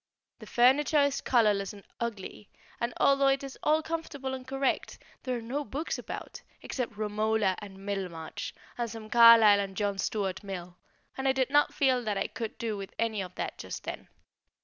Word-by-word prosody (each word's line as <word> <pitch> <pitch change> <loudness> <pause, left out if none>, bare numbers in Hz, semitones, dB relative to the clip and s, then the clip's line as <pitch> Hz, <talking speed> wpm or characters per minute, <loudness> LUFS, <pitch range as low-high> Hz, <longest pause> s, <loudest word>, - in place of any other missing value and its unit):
The - - -11
furniture 280 +4 +4
is 280 -1 0
colourless 210 -5 +2
and 200 -1 -13 0.2
ugly, 210 -3 -5 0.3
and, 235 +1 -1
although 275 0 +4
it 270 0 +2
is 275 -1 -7
all 310 +1 +2
comfortable 290 -5 -4
and 260 -1 -7
correct, 270 0 -1 0.2
there 255 -1 -2
are - - -6
no 270 +6 -2
books 285 +7 -4
about, - - -7 0.2
except 240 -5 -4
"Romola" 215 -2 +1
and 195 -1 -11
"Middlemarch" 180 -5 -4 0.3
and 235 -1 -1
some 220 -1 -9
Carlyle 230 -3 +8
and 195 -1 -4
John 200 -2 -1
Stuart 195 -2 -2
Mill, 180 -3 -7 0.4
and 265 0 -2
I 265 - +4
did 265 0 0
not 290 0 +3
feel 260 -3 +2
that 210 -3 -1
I - - 0
could 225 -3 -5
do 225 -2 -2
with 195 -1 -8
any 220 -3 0
of 180 -1 -7
that - - -4
just - - -6
then. - - -6
230 Hz, 185 wpm, -29 LUFS, 200-265 Hz, 0.4 s, Carlyle